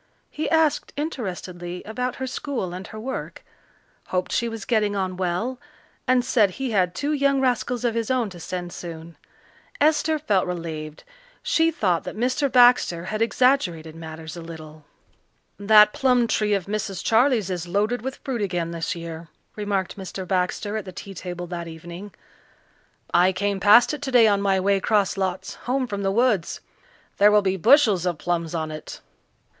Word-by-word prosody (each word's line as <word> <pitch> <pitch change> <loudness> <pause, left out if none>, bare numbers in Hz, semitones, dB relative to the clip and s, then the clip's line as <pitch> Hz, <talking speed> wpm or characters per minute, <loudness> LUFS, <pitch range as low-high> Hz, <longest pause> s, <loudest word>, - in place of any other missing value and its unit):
He 310 - -3
asked 320 -2 +2
interestedly 180 - -5
about 250 +3 -3
her 265 - -4
school 255 -8 -4
and 185 +1 -7
her 215 - -9
work, 260 +4 -6 0.6
hoped 185 0 -2
she 235 - 0
was 225 -2 -7
getting 210 -3 +1
on 185 -2 -2
well, 185 +8 -2 0.5
and 255 -1 +3
said 220 -5 +3
he 255 +6 -4
had 185 -3 +1
two 290 +7 -1
young 280 -1 +2
rascals 250 -1 0
of 235 - +1
his 230 -1 -2
own 250 -5 0
to 175 - -10
send 175 +1 -5
soon. 165 -1 -8 0.6
Esther 310 +1 +3
felt 205 -12 +1
relieved. 160 -3 -5 0.4
She 325 0 +3
thought 180 - 0
that - - -6
Mr. 255 +4 0
Baxter 245 -9 +5
had 215 +3 -3
exaggerated 205 - +1
matters 160 0 -8
a 170 - -7
little. 155 -2 -11 0.7
"That 210 +1 +6
plum 250 -2 +3
tree 210 -2 +1
of 190 -3 -2
Mrs. 200 -2 -3
Charley's 225 -4 +3
is 175 -1 -4
loaded 210 +6 0
with 265 +3 -4
fruit 250 -5 -3
again 175 -4 -2
this 165 0 -3
year," 165 -1 -7 0.3
remarked 205 -2 -2
Mr. 190 -1 -6
Baxter 190 +3 -1
at 210 - -5
the 185 - -7
tea 195 +2 -9
table 175 -1 -6
that 170 -1 -6
evening. 170 +5 -9 1.0
"I 180 +2 +5
came 200 +1 -1
past 210 +8 +6
it 295 - -5
today 255 -5 +4
on 200 -1 +2
my 195 -1 +2
way 195 +1 +2
'cross 205 0 +1
lots 190 -1 -3 0.2
home 260 +1 +1
from 200 -4 -4
the 195 -1 0
woods. 215 -5 +1 0.6
There 205 +1 +6
will 210 -1 +4
be 190 -1 +1
bushels 215 - +4
of 175 -3 -1
plums 170 0 -2
on 160 -1 -2
it." 155 - -8
200 Hz, 170 wpm, -24 LUFS, 175-245 Hz, 1.0 s, That